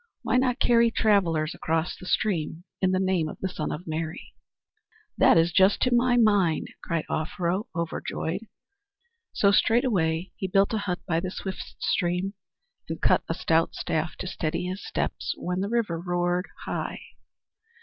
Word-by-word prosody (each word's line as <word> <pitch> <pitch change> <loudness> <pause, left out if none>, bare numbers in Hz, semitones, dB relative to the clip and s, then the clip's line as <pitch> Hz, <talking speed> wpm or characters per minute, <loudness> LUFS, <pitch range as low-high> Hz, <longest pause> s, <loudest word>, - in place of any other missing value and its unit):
Why - - +2
not 255 -1 +2
carry 235 -1 +4
travellers 180 -9 +2
across 160 +1 -1
the 185 - -11
stream 170 -6 0 0.2
in 190 - +3
the 185 0 +1
name 185 -4 +1
of - - -8
the 190 - -1
Son 165 -4 -4
of 175 - -5
Mary?" 160 0 -5 0.8
"That - - +5
is 165 +1 +4
just 190 +4 +4
to 250 - +2
my 245 0 +4
mind," 205 -8 +3
cried 165 -2 -2
Offero, 180 +6 -1
overjoyed. 170 +3 -3 0.8
So 200 - +3
straightway 195 -8 +2
he 190 - -2
built 195 +3 +3
a 220 - +1
hut 180 -3 -3
by 165 -1 +1
the 185 +2 -3
swift 190 0 -6
stream, 180 +3 0 0.6
and - - -4
cut - - +4
a - - 0
stout 165 0 +1
staff 160 0 -2
to - - -7
steady 165 -2 -2
his 185 +2 -4
steps - - -2
when 180 +1 -2
the 200 +2 -1
river 220 -8 0
roared 175 +1 0 0.2
high. - - -3
180 Hz, 160 wpm, -26 LUFS, 165-205 Hz, 0.8 s, That